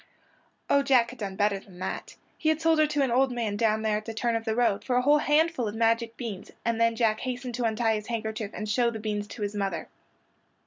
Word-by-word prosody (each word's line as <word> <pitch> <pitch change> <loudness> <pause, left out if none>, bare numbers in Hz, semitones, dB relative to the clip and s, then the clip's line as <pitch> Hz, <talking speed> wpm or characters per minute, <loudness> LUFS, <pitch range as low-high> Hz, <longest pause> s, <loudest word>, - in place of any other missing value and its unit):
Oh, 280 - +4
Jack 255 -4 +3
had 250 - -13
done 195 -3 -4
better 205 0 +1
than 190 -2 -16
that. 180 - -5 0.2
He 315 - 0
had 315 0 +2
sold 325 -1 +3
her 310 - +5
to 295 -2 +1
an 260 - 0
old 260 +2 +3
man 230 -4 -2
down 220 0 +1
there 215 -1 +1
at 215 - -7
the 225 -1 -6
turn 235 +1 0
of 225 0 -2
the 220 - 0
road 235 -4 +2
for 250 - -1
a 250 - +3
whole 295 +2 +5
handful 295 -4 +2
of 210 - -4
magic 230 0 +1
beans; 220 -6 -6 0.2
and 230 0 0
then 230 0 +3
Jack 220 -2 +2
hastened 250 -1 -4
to 240 0 -1
untie 225 0 +1
his 215 0 -4
handkerchief 220 -2 -3
and 215 - -4
show 235 +3 +2
the 230 - -5
beans 210 -1 -3
to 210 - -6
his 205 0 -2
mother. 195 -4 -3
230 Hz, 255 wpm, -27 LUFS, 215-250 Hz, 0.2 s, her